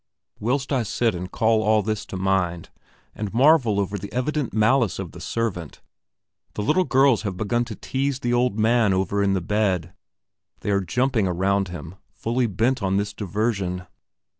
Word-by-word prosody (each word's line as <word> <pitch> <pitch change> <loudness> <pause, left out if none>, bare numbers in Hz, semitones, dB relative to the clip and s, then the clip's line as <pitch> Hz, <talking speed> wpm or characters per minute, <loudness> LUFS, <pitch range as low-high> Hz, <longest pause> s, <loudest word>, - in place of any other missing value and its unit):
Whilst 130 +5 -1
I 130 - +2
sit 115 0 0
and 90 +1 -6
call 110 -1 +2
all 110 0 +3
this 110 -1 -3
to 95 - -6
mind, 90 -3 -1 0.4
and 105 -2 -5
marvel 130 -6 +4
over 100 0 -2
the 100 +1 -8
evident 130 +3 -1
malice 110 -2 +2
of - - -5
the - - -11
servant, 100 -9 -3 0.8
the 105 - -2
little 180 - +2
girls 135 -4 +4
have 100 -4 -4
begun 120 +4 0
to 115 -3 -7
tease 135 +5 -2
the 120 -2 -1
old 120 -3 +1
man 110 -2 +3
over 95 +2 0
in 100 -1 +2
the 95 - 0
bed; 90 -3 0 0.7
they 105 - -1
are 100 0 +2
jumping 120 +3 +1
around 95 +2 +1
him, 85 +1 -8
fully 120 +2 -1
bent 115 +6 0
on 95 0 +1
this 100 0 -2
diversion. 100 -2 -2
105 Hz, 175 wpm, -23 LUFS, 95-120 Hz, 0.8 s, marvel